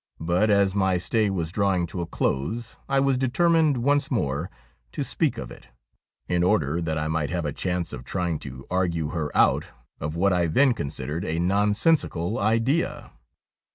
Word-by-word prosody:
But, 85 Hz, +6 st, +1 dB
as 100 Hz, -2 st, +3 dB
my 95 Hz, -2 st, +2 dB
stay 105 Hz, +4 st, +1 dB
was 85 Hz, -4 st, -2 dB
drawing 95 Hz, -3 st, +1 dB
to 85 Hz, +1 st, -5 dB
a 85 Hz, -, -4 dB
close, 110 Hz, -, -2 dB
I 135 Hz, 0 st, +3 dB
was 135 Hz, -1 st, +2 dB
determined 155 Hz, +2 st, +3 dB
once 140 Hz, +4 st, +1 dB
more 75 Hz, -, -1 dB, 0.4 s
to -, -, -2 dB
speak -, -, 0 dB
of -, -, -6 dB
it, -, -, -13 dB, 0.6 s
in 90 Hz, -1 st, +1 dB
order 85 Hz, -2 st, +1 dB
that 80 Hz, -2 st, -2 dB
I 75 Hz, 0 st, -1 dB
might 80 Hz, -2 st, -1 dB
have 85 Hz, -2 st, -2 dB
a 75 Hz, -, -2 dB
chance 90 Hz, -2 st, -2 dB
of 60 Hz, -, -7 dB
trying 85 Hz, 0 st, -2 dB
to 65 Hz, -1 st, -9 dB
argue 85 Hz, -4 st, 0 dB
her 80 Hz, -3 st, -2 dB
out -, -, +4 dB, 0.3 s
of 75 Hz, +2 st, -4 dB
what 95 Hz, +3 st, +2 dB
I 85 Hz, -1 st, +2 dB
then 130 Hz, -, +4 dB
considered 75 Hz, -, -4 dB
a 80 Hz, -, -2 dB
nonsensi 105 Hz, -, +2 dB
cal 85 Hz, +6 st, -3 dB
idea. 115 Hz, +10 st, 0 dB
90 Hz, 180 wpm, -25 LUFS, 80-110 Hz, 0.6 s, out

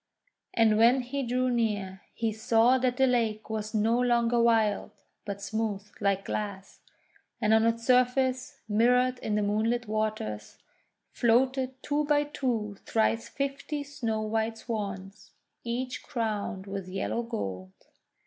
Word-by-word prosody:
And 220 Hz, -2 st, +4 dB
when 240 Hz, +3 st, +5 dB
he 265 Hz, +3 st, -3 dB
drew 255 Hz, 0 st, 0 dB
near, 205 Hz, -5 st, -1 dB
he 225 Hz, -1 st, -1 dB
saw 225 Hz, +4 st, +3 dB
that 250 Hz, -1 st, 0 dB
the 265 Hz, -, +5 dB
lake 225 Hz, -4 st, 0 dB
was 215 Hz, 0 st, -3 dB
no 225 Hz, +3 st, +2 dB
longer 240 Hz, -1 st, +2 dB
wild, 225 Hz, -3 st, +2 dB, 0.4 s
but 200 Hz, -1 st, -5 dB
smooth 215 Hz, -1 st, -2 dB, 0.2 s
like 195 Hz, -1 st, +1 dB
glass, 200 Hz, -2 st, -5 dB, 0.6 s
and 215 Hz, -1 st, +3 dB
on 220 Hz, +1 st, +5 dB
its 230 Hz, 0 st, -1 dB
surface, 255 Hz, +2 st, +2 dB
mirrored 250 Hz, +4 st, +3 dB
in 215 Hz, -, -2 dB
the 210 Hz, -, +1 dB
moonlit 225 Hz, +3 st, 0 dB
waters, 210 Hz, -, -3 dB, 0.5 s
floated 255 Hz, +2 st, +1 dB
two 295 Hz, +1 st, 0 dB
by 290 Hz, 0 st, +3 dB
two 235 Hz, -8 st, -2 dB
thrice 225 Hz, 0 st, 0 dB
fifty 280 Hz, +1 st, -3 dB
snow 235 Hz, -7 st, -3 dB
white 220 Hz, +1 st, -1 dB
Swans, 200 Hz, -3 st, -6 dB, 0.3 s
each 250 Hz, +2 st, -3 dB
crowned 215 Hz, -6 st, -3 dB
with 195 Hz, -2 st, -5 dB
yellow 195 Hz, +5 st, -2 dB
gold. 95 Hz, -, -5 dB
225 Hz, 135 wpm, -28 LUFS, 210-250 Hz, 0.6 s, when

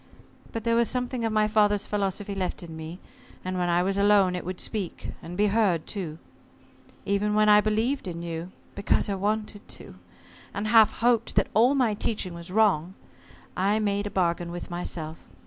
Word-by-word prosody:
But 225 Hz, -, -4 dB
there 230 Hz, 0 st, +2 dB
was 235 Hz, 0 st, +3 dB
something 250 Hz, -1 st, -2 dB
of 225 Hz, -, 0 dB
my 215 Hz, 0 st, +3 dB
father's 210 Hz, -1 st, +2 dB
philosophy 200 Hz, 0 st, -2 dB
left 185 Hz, -2 st, -3 dB
in 165 Hz, -2 st, -8 dB
me, 160 Hz, +2 st, -7 dB, 0.5 s
and 185 Hz, 0 st, -2 dB
when 175 Hz, 0 st, 0 dB
I 175 Hz, +1 st, +3 dB
was 195 Hz, +1 st, 0 dB
alone 200 Hz, -2 st, +4 dB
it 180 Hz, -, -4 dB
would 185 Hz, 0 st, -5 dB
speak, 200 Hz, -6 st, -4 dB
and 175 Hz, +2 st, -8 dB
be 210 Hz, -, +3 dB
heard, 200 Hz, -6 st, +2 dB
too. 170 Hz, -7 st, -5 dB, 0.9 s
Even 205 Hz, +1 st, +1 dB
when 215 Hz, 0 st, +4 dB
I 210 Hz, 0 st, +7 dB
believed 220 Hz, +4 st, 0 dB
in 170 Hz, -1 st, -5 dB
you 170 Hz, +1 st, -5 dB, 0.2 s
because 200 Hz, +1 st, +1 dB
I -, -, 0 dB
wanted 210 Hz, +1 st, -2 dB
to -, -, -8 dB, 0.6 s
and 205 Hz, 0 st, -2 dB
half 220 Hz, -1 st, +7 dB
hoped 235 Hz, -1 st, +1 dB
that -, -, +2 dB
all 245 Hz, +6 st, +4 dB
my 245 Hz, -6 st, +2 dB
teaching 205 Hz, -3 st, -2 dB
was 170 Hz, +1 st, -8 dB
wrong, 190 Hz, -4 st, +2 dB, 0.6 s
I 200 Hz, +3 st, +2 dB
made 205 Hz, -1 st, 0 dB
a -, -, -3 dB
bargain 175 Hz, -2 st, 0 dB
with 175 Hz, +1 st, -7 dB
myself. 165 Hz, -2 st, -5 dB
200 Hz, 185 wpm, -26 LUFS, 180-215 Hz, 0.9 s, I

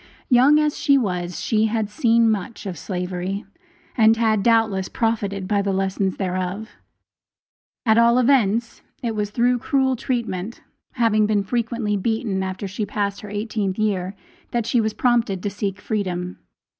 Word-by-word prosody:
Young 265 Hz, +4 st, +6 dB
as 300 Hz, -1 st, +1 dB
she 280 Hz, -2 st, +4 dB
was, 180 Hz, -7 st, -2 dB
she 220 Hz, -1 st, +1 dB
had 220 Hz, -1 st, -1 dB
seen 230 Hz, +2 st, +3 dB
much 215 Hz, 0 st, -2 dB
of 190 Hz, -3 st, -4 dB
slavery, 180 Hz, +3 st, -4 dB, 0.5 s
and 225 Hz, -1 st, +5 dB
had, 220 Hz, -2 st, +2 dB
doubtless, 220 Hz, -4 st, +2 dB
profited 200 Hz, -4 st, -1 dB
by 200 Hz, 0 st, +1 dB
the 200 Hz, 0 st, -1 dB
lessons 190 Hz, 0 st, -1 dB
thereof. 185 Hz, +3 st, -3 dB, 1.1 s
At 220 Hz, 0 st, +4 dB
all 235 Hz, +1 st, +5 dB
events, 235 Hz, -3 st, +2 dB, 0.2 s
it 230 Hz, -2 st, -1 dB
was 210 Hz, -1 st, -1 dB
through 245 Hz, +3 st, +1 dB
cruel 265 Hz, -1 st, +1 dB
treatment, 230 Hz, -4 st, -3 dB, 0.3 s
having 215 Hz, -3 st, +2 dB
been 210 Hz, -2 st, +1 dB
frequently 230 Hz, -1 st, -1 dB
beaten 215 Hz, -1 st, -1 dB
after 190 Hz, +1 st, -4 dB
she 190 Hz, +3 st, -6 dB
had 205 Hz, -, -2 dB
passed 200 Hz, -1 st, -2 dB
her 210 Hz, -, -9 dB
eighteenth 205 Hz, -2 st, -2 dB
year, 200 Hz, -3 st, -1 dB, 0.3 s
that 235 Hz, -2 st, -1 dB
she 235 Hz, +1 st, +2 dB
was 220 Hz, -1 st, -1 dB
prompted 235 Hz, -7 st, +1 dB
to 205 Hz, -, -2 dB
seek 200 Hz, -1 st, -3 dB
freedom. 185 Hz, -4 st, -3 dB
215 Hz, 155 wpm, -22 LUFS, 195-230 Hz, 1.1 s, Young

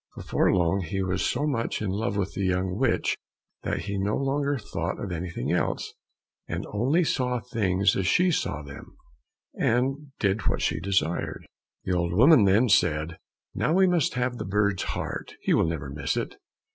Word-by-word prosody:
Before -, -, +1 dB
long 90 Hz, +1 st, +2 dB
he 95 Hz, +2 st, -2 dB
was 90 Hz, 0 st, -1 dB
so 145 Hz, -, 0 dB
much 125 Hz, -6 st, -1 dB
in 105 Hz, -3 st, -2 dB
love 105 Hz, +1 st, -1 dB
with 100 Hz, -1 st, -1 dB
the 100 Hz, -, -3 dB
young 90 Hz, 0 st, 0 dB
witch 125 Hz, +2 st, +1 dB, 0.5 s
that -, -, -2 dB
he 100 Hz, -1 st, -3 dB
no 100 Hz, +2 st, 0 dB
longer 140 Hz, +1 st, 0 dB
thought 85 Hz, -6 st, -4 dB
of 100 Hz, -, -5 dB
anything 85 Hz, 0 st, -3 dB
else, -, -, -1 dB, 0.5 s
and -, -, -3 dB
only 135 Hz, +12 st, +2 dB
saw 125 Hz, -5 st, 0 dB
things 100 Hz, -5 st, +1 dB
as 95 Hz, -2 st, 0 dB
she 180 Hz, -, +4 dB
saw 75 Hz, -, -1 dB
them, 70 Hz, -1 st, -11 dB, 0.6 s
and 135 Hz, +4 st, 0 dB
did 100 Hz, 0 st, 0 dB
what -, -, +1 dB
she 80 Hz, -, 0 dB
desired. 95 Hz, -1 st, -1 dB, 0.4 s
The 95 Hz, -, -1 dB
old 85 Hz, -1 st, 0 dB
woman 125 Hz, -, +6 dB
then 105 Hz, +6 st, +4 dB
said, 80 Hz, -5 st, +2 dB, 0.3 s
"Now 155 Hz, -, 0 dB
we 190 Hz, 0 st, +5 dB
must 175 Hz, -8 st, +1 dB
have 125 Hz, 0 st, -1 dB
the -, -, -2 dB
bird's 100 Hz, 0 st, +1 dB, 0.2 s
heart, -, -, -5 dB
he -, -, +1 dB
will -, -, +3 dB
never 80 Hz, -4 st, -3 dB
miss 70 Hz, -1 st, -2 dB
it." -, -, -3 dB
100 Hz, 180 wpm, -26 LUFS, 90-125 Hz, 0.6 s, woman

